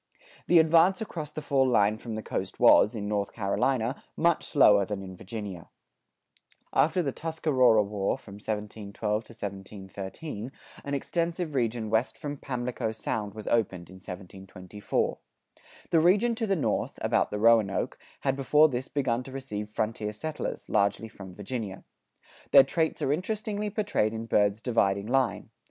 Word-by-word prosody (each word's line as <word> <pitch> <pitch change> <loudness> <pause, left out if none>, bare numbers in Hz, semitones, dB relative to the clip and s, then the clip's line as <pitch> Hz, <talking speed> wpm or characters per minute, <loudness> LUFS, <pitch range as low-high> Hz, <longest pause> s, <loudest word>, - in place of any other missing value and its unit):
The 175 - +6
advance 165 +4 +5
across 165 -9 -5
the 155 - -6
fall 135 -2 +2
line 110 -3 +3
from 115 -2 -6
the 110 - -5
coast - - -4
was, 105 - +6
in 105 -2 -4
North 100 -1 -1
Carolina, 115 +4 0
much 170 0 +2
slower 105 -8 +5
than 100 0 -4
in 95 -1 -8
Virginia. 100 -3 -7 1.0
After 165 +4 +3
the 140 - -1
Tuscarora 130 -8 +2
War 100 -1 -1
(1712 105 0 -4
13) 100 - -7 0.3
an 140 - -4
extensive 170 +2 -2
region 115 -4 -1
west 110 +3 +1
from 145 -2 -5
Pamlico 125 -3 -3
Sound 110 -2 -4
was 110 - -8
opened 95 -7 0
(1724). 95 +1 -5 0.7
The 165 - +5
region 200 +8 +4
to 225 -1 -2
the 195 - +2
north, 160 - -1
about - - +2
the 105 - -3
Roanoke, 110 -2 +3 0.2
had 135 -1 +1
before 150 +3 +4
this 130 0 -3
begun 125 -4 0
to 130 - -10
receive 105 -6 -5
frontier 105 0 -2
settlers, 155 +8 -5
largely 100 +3 +1
from 95 -4 -11
Virginia. 105 -1 -5 0.7
Their 140 - +9
traits 160 +4 -1
are 135 - +2
interestingly 210 +4 -2
portrayed 200 - 0
in 110 +1 -4
Byrd's 105 -1 +2
"Dividing 100 -5 +1
Line." 125 -3 0
115 Hz, 145 wpm, -28 LUFS, 105-145 Hz, 1.0 s, Their